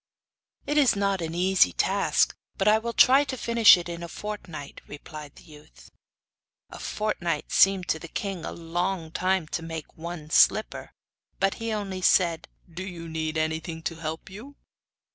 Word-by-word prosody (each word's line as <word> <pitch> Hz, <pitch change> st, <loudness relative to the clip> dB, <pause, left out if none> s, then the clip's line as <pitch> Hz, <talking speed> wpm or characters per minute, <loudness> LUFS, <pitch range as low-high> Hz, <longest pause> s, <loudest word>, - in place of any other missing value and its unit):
'It 295 Hz, +1 st, +2 dB
is 275 Hz, -7 st, +4 dB
not 200 Hz, -2 st, 0 dB
an 165 Hz, 0 st, -4 dB
easy 185 Hz, -, +3 dB
task; -, -, +1 dB, 0.2 s
but 195 Hz, -, 0 dB
I 215 Hz, +1 st, +5 dB
will 235 Hz, +1 st, -4 dB
try 265 Hz, +4 st, +6 dB
to 265 Hz, -2 st, -5 dB
finish 230 Hz, -4 st, +6 dB
it 175 Hz, -, -6 dB
in 170 Hz, 0 st, -6 dB
a 170 Hz, -, -5 dB
fortnight,' 170 Hz, -7 st, -8 dB
replied 150 Hz, 0 st, -10 dB
the -, -, -16 dB
youth. 150 Hz, -, -17 dB, 0.8 s
A -, -, -9 dB
fortnight 175 Hz, -7 st, -3 dB
seemed 195 Hz, -2 st, +4 dB
to 160 Hz, -, 0 dB
the 165 Hz, -, -9 dB
king 190 Hz, 0 st, -4 dB
a -, -, -5 dB
long 170 Hz, 0 st, -3 dB
time 185 Hz, -1 st, 0 dB
to -, -, -3 dB
make 165 Hz, -2 st, -7 dB
one 160 Hz, -2 st, -8 dB
slipper. 215 Hz, -, +3 dB, 0.5 s
But 195 Hz, 0 st, +2 dB
he 225 Hz, 0 st, -2 dB
only 195 Hz, -3 st, -4 dB
said: 170 Hz, -3 st, +2 dB, 0.3 s
'Do 175 Hz, -, -6 dB
you 175 Hz, -3 st, -8 dB
need 160 Hz, -1 st, -3 dB
anything 160 Hz, +1 st, -3 dB
to 165 Hz, -, -3 dB
help 160 Hz, 0 st, -6 dB
you? 230 Hz, +9 st, -11 dB
175 Hz, 170 wpm, -26 LUFS, 160-200 Hz, 0.8 s, try